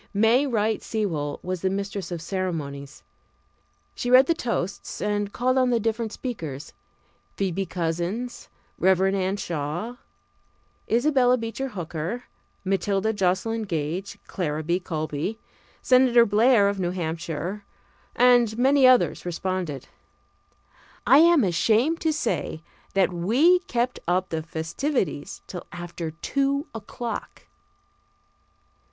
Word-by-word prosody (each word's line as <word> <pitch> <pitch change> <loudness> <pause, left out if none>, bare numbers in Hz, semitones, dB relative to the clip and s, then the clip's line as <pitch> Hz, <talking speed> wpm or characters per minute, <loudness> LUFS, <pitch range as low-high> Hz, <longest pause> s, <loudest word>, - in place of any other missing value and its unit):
May 230 +7 +4
Wright 220 -3 0
Sewall 165 -10 -2
was 185 -1 -3
the 190 - +1
mistress 200 0 -4
of 170 -2 -4
ceremonies. 155 -7 -4 0.9
She 245 - -3
read 255 +2 +8
the 335 - +2
toasts 225 - -3
and 205 -1 -1
called 255 +3 +1
on 255 -1 +3
the 240 -1 +2
different 225 0 -1
speakers. 160 - -6 0.6
Phoebe 195 -1 -1
Couzins, 175 +8 -3 0.3
Rev. 185 0 +4
Anna 190 0 0
Shaw, 175 +8 -4 0.9
Isabella 250 +1 +4
Beecher 230 +3 -4
Hooker, 175 +2 -5 0.4
Matilda 195 +2 0
Joslyn 200 +4 0
Gage, 175 0 -3
Clara 155 -4 -3
B. 170 +3 0
Colby, 155 +3 -3 0.5
Senator 250 -2 +5
Blair 215 0 +4
of 200 -1 -1
New 175 -2 0
Hampshire, 170 +2 -4 0.5
and 245 -3 +4
many 265 +1 +5
others 255 -1 +4
responded. 175 -5 -3 1.2
I 265 +6 +7
am 335 -4 +6
ashamed 220 - +2
to 320 - +2
say 230 - -2 0.3
that 190 -1 +3
we 250 - +4
kept 245 +1 -1
up 180 +1 +1
the 160 -1 -2
festivities 165 - -3
till 180 - -8
after 175 -1 -6
two 275 - -1
o'clock. 225 +2 -6
200 Hz, 115 wpm, -25 LUFS, 175-245 Hz, 1.2 s, read